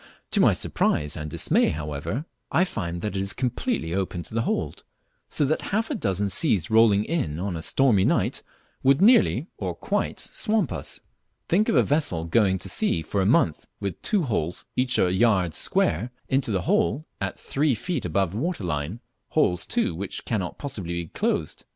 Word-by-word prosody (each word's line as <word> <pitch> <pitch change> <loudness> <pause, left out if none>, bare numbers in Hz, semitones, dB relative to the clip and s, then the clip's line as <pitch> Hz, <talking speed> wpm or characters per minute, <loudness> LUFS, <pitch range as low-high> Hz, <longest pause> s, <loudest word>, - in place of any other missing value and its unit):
To - - +2
my - - +6
surprise 75 0 +1
end 75 -1 -5
dismay, - - +2
however, 75 - -4 0.3
I 180 - +4
find 85 - -4
that 105 -2 -2
it - - 0
is 95 0 -2
completely 125 - -2
open 95 -2 -2
to 80 - -6
the 115 - +1
hold, - - -2 0.5
so 145 - +2
that 155 +3 0
half 220 +7 0
a - - +1
dozen 100 - -1
seas 100 - 0
rolling 110 -2 +5
in 140 - -1
on 95 +1 -3
a 80 - -4
stormy 115 0 +3
night - - +1 0.4
would 135 +2 +4
nearly, 235 +6 +5
or - - -3
quite, - - -2
swamp 215 - 0
us. 75 -5 -4 0.5
Think 210 +7 +3
of - - +2
a - - +6
vessel 145 - 0
going 95 +1 +3
to 90 - -6
sea 80 - 0
for 100 +5 -1
a 95 - +2
month 105 - +2
with 100 -4 -4
two 200 -4 +1
holes, 90 - -2
each 125 0 +1
a 90 0 +3
yard 95 -5 +3
square, 95 +10 +1 0.2
into 130 -2 +1
the 95 -4 0
hold, 200 -5 +1 0.2
at 100 -1 -3
three 140 -2 +1
feet 160 - -3
above 90 +1 0
the 100 - -5
water 160 - -2
line, 80 +5 -3 0.3
holes, 90 -1 +1
too, - - 0
which 95 +4 -5
cannot 95 -6 -2
possibly 100 - -5
be 85 -1 -3
closed! - - -2
100 Hz, 190 wpm, -25 LUFS, 85-140 Hz, 0.5 s, my